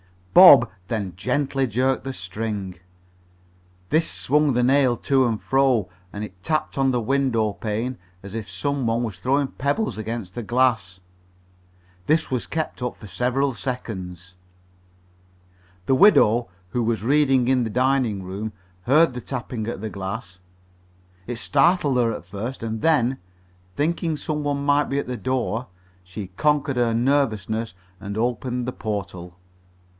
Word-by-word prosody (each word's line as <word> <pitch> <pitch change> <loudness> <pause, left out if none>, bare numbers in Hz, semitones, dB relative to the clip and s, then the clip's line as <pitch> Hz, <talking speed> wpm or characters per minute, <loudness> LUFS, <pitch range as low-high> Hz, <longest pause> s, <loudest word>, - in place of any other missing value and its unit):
Bob 140 - +9 0.2
then 100 -5 -3
gently 135 +7 0
jerked 130 +4 0
the 135 - -3
string. 95 -2 -5 1.1
This 160 +2 +2
swung 150 0 +2
the 125 +1 +2
nail 130 -1 +3
to 130 0 +2
and 110 -2 -1
fro, 130 -8 +2 0.2
and 105 - -5
it 95 -3 -10
tapped 155 +9 -1
on 135 -1 +2
the 125 -2 0
window 120 -4 +1
pane 110 +7 -3 0.2
as 100 0 -9
if 110 -3 -5
some 135 +7 -2
one 115 +1 +1
was 105 -6 -5
throwing 135 +6 +1
pebbles 140 - -2
against 110 -4 -5
the 120 - -4
glass. 115 -7 0 1.1
This 155 -2 +2
was 125 -2 -1
kept 160 -5 -3
up 125 -1 -3
for - - -12
several 130 +5 0
seconds. 95 -6 -6 1.5
The - - +2
widow, 125 - +5 0.2
who 120 - -1
was 115 -2 -1
reading 135 -1 +3
in 130 -2 +3
the 115 - -2
dining 125 -4 +1
room, 100 +4 -5 0.3
heard 150 - +4
the 125 - -6
tapping 120 -4 -5
at 115 -4 -4
the 110 - -4
glass. 95 -1 -6 0.9
It 120 - -3
startled 145 +1 +2
her 120 -2 +2
at - - -8
first, 105 +8 -6
and 110 -1 -3
then, 135 -5 +2 0.6
thinking 165 +1 0
some 150 0 -3
one 140 -1 -1
might 145 0 +3
be 140 - -2
at 140 - -2
the 125 -1 -4
door, 125 +1 -2 0.4
she 90 +2 -7
conquered 140 +7 0
her 120 -2 +2
nervousness 115 -5 0 0.2
and 100 +1 -6
opened 120 +1 -1
the 125 - -3
portal. 100 -5 -5
120 Hz, 150 wpm, -23 LUFS, 105-135 Hz, 1.5 s, Bob